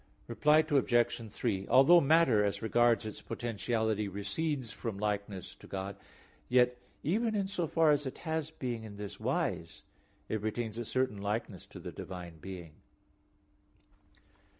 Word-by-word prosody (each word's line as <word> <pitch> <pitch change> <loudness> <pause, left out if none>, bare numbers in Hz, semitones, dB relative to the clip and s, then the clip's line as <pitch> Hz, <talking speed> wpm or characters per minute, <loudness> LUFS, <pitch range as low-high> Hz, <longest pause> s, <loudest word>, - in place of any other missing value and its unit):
Reply 150 +6 +4
Obj. 120 -6 +2
3: 100 -5 -2
Although 170 +6 +7
matter 140 -7 +5
as 100 +2 -1
regards 115 -1 +3
its 110 - -6
potentiality 110 -2 -1
recedes 125 - -2
from 115 -3 -5
likeness 100 -2 -3
to - - -16
God, 95 +1 -4 0.5
yet, 125 0 +4 0.3
even 220 +7 +1
in 200 -2 0
so 180 -4 -2
far 160 0 +4
as 145 -1 +1
it 130 - -6
has 160 -1 -1
being 125 -7 -4
in 105 -2 -9
this 105 -1 -7
wise, - - -2 0.4
it 110 - -2
retains 110 +1 -3
a 120 - -3
certain 130 -4 -1
likeness 105 -2 -3
to - - -11
the - - -7
divine 90 -3 -8
being. 85 -2 -8
115 Hz, 145 wpm, -32 LUFS, 100-145 Hz, 0.5 s, Although